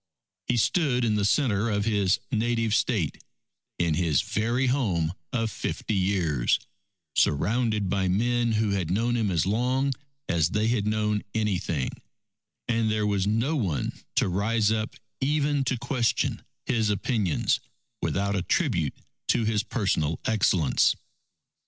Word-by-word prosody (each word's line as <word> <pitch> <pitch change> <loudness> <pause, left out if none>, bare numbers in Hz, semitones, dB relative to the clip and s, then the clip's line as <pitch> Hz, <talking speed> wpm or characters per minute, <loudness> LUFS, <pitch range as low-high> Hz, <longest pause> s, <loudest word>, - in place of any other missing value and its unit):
He 125 - +1
stood 125 - +2
in 110 - +2
the 105 -1 +1
centre 110 -3 +2
of 100 -1 0
his 100 -5 +2
native 115 -1 +1
State, 110 - 0 0.5
in 85 -2 +1
his 80 -5 +2
very 120 +5 0
home 100 - +1 0.2
of 115 -2 -1
fifty 110 - -3
years, 90 -10 +1 0.6
surrounded 105 - +1
by 95 0 0
men 120 +4 +1
who 110 -1 +1
had 95 -5 -1
known 115 +6 +1
him 110 -4 +1
as 85 -3 +1
long 125 +6 +1 0.3
as 85 -2 +2
they 105 +1 +1
had 110 -3 0
known 105 -1 +1
anything, 95 -9 -1 0.8
and 115 -2 +1
there 110 -1 +1
was 100 -2 +1
no 115 +9 +1
one 95 - -1 0.2
to - - +3
rise 105 +4 +1
up 110 0 -2 0.2
even 145 0 +1
to 130 0 0
question 120 0 0 0.2
his 110 -3 +1
opinions, 105 - +1 0.4
without 100 +1 0
a 95 - 0
tribute 90 - 0 0.3
to 115 - +2
his 110 -2 +1
personal 80 - -1
excellence. 95 -8 +3
105 Hz, 140 wpm, -26 LUFS, 95-120 Hz, 0.8 s, to